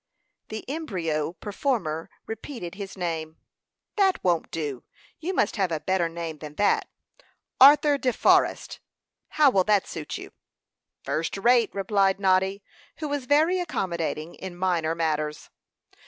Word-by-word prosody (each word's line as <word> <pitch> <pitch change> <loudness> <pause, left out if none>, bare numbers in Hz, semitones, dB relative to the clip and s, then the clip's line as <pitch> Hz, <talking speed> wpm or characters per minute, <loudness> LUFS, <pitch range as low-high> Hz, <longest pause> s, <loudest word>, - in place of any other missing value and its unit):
The 220 0 -6
embryo 175 - -2
performer 190 - -2 0.2
repeated 225 -5 -7
his 195 0 -8
name. 160 -3 -3 0.6
"That 385 -2 +2
won't 175 -3 +1
do; 145 -6 -4 0.4
you 335 +4 -3
must 365 - 0
have 190 -3 +1
a 160 - -1
better 175 +1 0
name 165 -2 -6
than 150 0 -9
that. 205 - +2 0.7
Arthur 285 +1 +7
De 255 - +1
Forrest - - +2 0.5
how 295 -3 +4
will 190 -5 +3
that 205 -2 +3
suit 155 -2 -6
you?" - - -10 0.7
"First 165 +4 -2
rate," 235 +2 +4
replied 195 -1 +2
Noddy, 190 +1 +2 0.3
who 310 - -4
was 285 -3 -2
very 315 +6 +3
accommodating 170 - -3
in 185 -2 -8
minor 170 -3 0
matters. 155 -2 -2
190 Hz, 135 wpm, -26 LUFS, 165-245 Hz, 0.7 s, Arthur